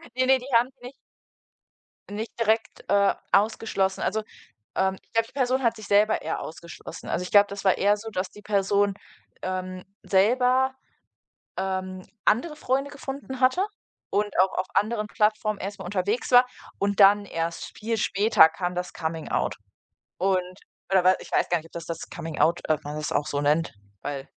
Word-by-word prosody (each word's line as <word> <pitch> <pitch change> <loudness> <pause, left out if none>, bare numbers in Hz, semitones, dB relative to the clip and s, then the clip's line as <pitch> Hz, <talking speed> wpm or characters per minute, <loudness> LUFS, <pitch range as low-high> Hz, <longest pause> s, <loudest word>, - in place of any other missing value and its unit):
Ne, 255 - +2
ne, 265 0 +6
die 250 - -10
haben 235 +2 +4
sie 260 -2 -17
nicht 265 - -11 1.2
nicht 215 +3 -6
direkt, 220 0 0
äh, 200 0 +4 0.2
ausgeschlossen, 200 -2 +1
also, 215 +2 -1 0.5
ähm, 190 0 +1
ich - - -36
glaube 230 0 +2
die - - -19
Person 260 0 +1
hat 230 -1 +2
sich 215 - -9
selber 210 +2 +3
eher 160 - -3
ausgeschlossen, 165 +2 -9
also 180 - -1
ich 180 - -6
glaube, 205 0 +7
das 200 0 -7
war 190 - +4
eher 205 +1 +3
so, 220 +2 -8
dass 185 -2 -2
die 210 - -14
Person, 200 0 +1 0.5
ähm, 185 0 -4 0.2
selber, 250 +6 +3 0.8
ähm, 185 -1 -3 0.2
andere 300 +8 +2
Freunde 275 -1 -1
gefunden 270 -1 -7
hatte 265 +10 +3 0.5
und 205 -2 0
auch 190 +1 +4
auf 185 - -1
anderen 215 0 +1
Plattformen 215 0 0
erst 200 +1 -6
mal 190 - -7
unterwegs 200 +7 -1
war. 245 0 +8 0.3
Und 200 0 0
dann, 200 +1 +7
erst 165 -2 -4
viel 225 +1 -2
später, 205 -4 +5
kam 175 +2 -4
das 180 0 -4
Coming-out. 160 -1 -2 0.6
Und 185 0 0 0.3
oder 190 -2 +4
we 185 0 +5
ich - - -12
weiß - - +2
gar 175 - +2
nicht, 160 - -12
ob - - -21
das 170 -1 -7
das 165 -1 -6
Coming-out 165 +1 0
ob 155 -1 +1
man 150 +1 -5
das 155 0 -3
auch 145 - 0
so 145 - -2
nennt, 150 +3 +1 0.3
weil 140 -2 -4
200 Hz, 180 wpm, -25 LUFS, 180-225 Hz, 1.2 s, war